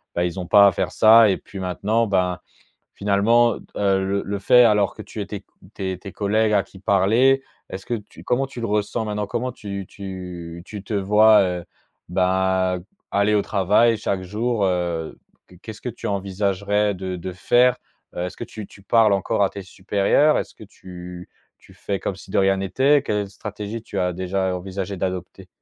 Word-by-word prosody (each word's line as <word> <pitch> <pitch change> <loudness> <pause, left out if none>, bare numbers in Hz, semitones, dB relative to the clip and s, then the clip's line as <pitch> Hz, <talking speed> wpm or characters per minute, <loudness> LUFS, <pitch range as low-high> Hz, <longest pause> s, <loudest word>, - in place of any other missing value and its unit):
bah 85 - +1
ils 90 +1 -3
ont 90 - -4
pas 100 +1 +7
à - - +4
faire - - -2
ça 110 0 +7
et 95 - 0
puis 100 - -12
maintenant 100 +5 0
ben, 90 -3 0 0.6
finalement, 115 +4 +3
heu, - - -10
d - - -18
heu, 95 -1 +1
le 100 +1 -1
le 100 0 -3
fait, 125 +4 +6
alors, 105 -3 +3
que - - -10
tu 105 - -8
ai 100 - -4
tes 100 -1 -6
q - - -51 0.3
tes 95 -2 -4
tes 100 +1 -10
collègues 105 +1 +1
à 100 - +3
qui 95 - -16
parler, 110 +8 +3 0.3
est-ce 95 0 -7
que 120 - -1
tu 105 -3 -10
comment 135 +2 0
tu 130 -3 -8
le 115 - -2
ressens, 105 +2 -1
maintenant? 105 0 -2
Comment 125 +4 -2
tu 100 -5 -7
tu 90 -4 -8
tu 105 -2 -8
te 110 - -7
vois, 105 +2 +5
heu, 90 -2 -2 0.5
bah, 95 0 +1 0.3
aller 100 +1 +2
au 100 - +2
travail 105 +4 +3
chaque 100 -3 -2
jour, 105 +3 -1
heu? 85 -3 -2 0.3
Q 90 - -17
Qu'est-ce 110 -2 -9
que - - -5
tu 120 - -7
envisagerais 100 +1 0
de 95 0 -5
de 90 +1 -6
faire? 120 +7 +3 0.4
Heu, 90 - -3
est-ce 90 - -8
que - - -6
tu 110 -3 -9
tu 100 - -17
parles 110 +1 +4
encore 100 +1 0
à 95 - 0
tes 100 - -8
supérieurs? 100 +10 +2
Est-ce - - -5
que - - -13
tu 90 -3 -11 0.3
tu - - -20
fais 100 -1 -3
comme 95 - -3
si - - -14
de - - +2
rien 95 0 +3
n'était? 130 +9 +2
Quelle 105 -6 -2
stratégie 105 +2 -6
tu 100 - -6
as 90 0 0
déjà 95 +1 -2
envisagé 95 +2 -5
d'adopter? 90 0 -5
100 Hz, 205 wpm, -22 LUFS, 95-105 Hz, 0.6 s, pas